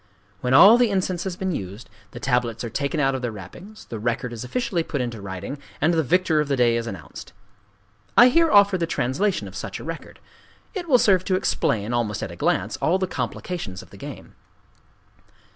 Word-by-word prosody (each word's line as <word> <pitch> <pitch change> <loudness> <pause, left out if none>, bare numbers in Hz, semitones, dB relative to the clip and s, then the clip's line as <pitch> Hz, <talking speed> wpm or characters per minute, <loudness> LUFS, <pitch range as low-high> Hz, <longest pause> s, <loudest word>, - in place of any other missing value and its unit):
When 125 +3 +1
all 210 - +9
the 245 -2 +4
incense 185 -2 -1
has 190 -2 -3
been 190 0 -2
used, 100 - -6 0.2
the 120 - -9
tablets 125 -3 0
are 115 - -5
taken 140 +5 -2
out 135 -2 +2
of 130 - -3
their 120 -2 -2
wrappings, 140 - -11
the 115 - -7
record 120 +2 -2
is 115 0 -6
officially 185 - -1
put 150 -3 -4
into 120 -4 -4
writing, 100 +8 -6 0.2
and 160 +3 +2
the 165 - +3
victor 165 +1 +2
of 150 - -2
the 140 - +1
day 120 -2 +3
is 115 0 -2
announced. 80 -6 -9 0.8
I 245 +1 +9
here 330 +4 +4
offer 200 -2 +5
the 165 - 0
translation 135 - -1
of 95 - -11
such 100 0 -5
a - - -9
record: 165 +1 -7 0.6
it 355 -5 -5
will 255 - +7
serve 190 -6 +3
to 185 - +1
explain, 115 - 0
almost 110 -4 -1
at - - -5
a - - -9
glance, - - 0
all 175 +4 +2
the 190 - 0
complications 170 - -5
of - - -19
the - - -13
game. - - -9
140 Hz, 210 wpm, -23 LUFS, 115-185 Hz, 0.8 s, all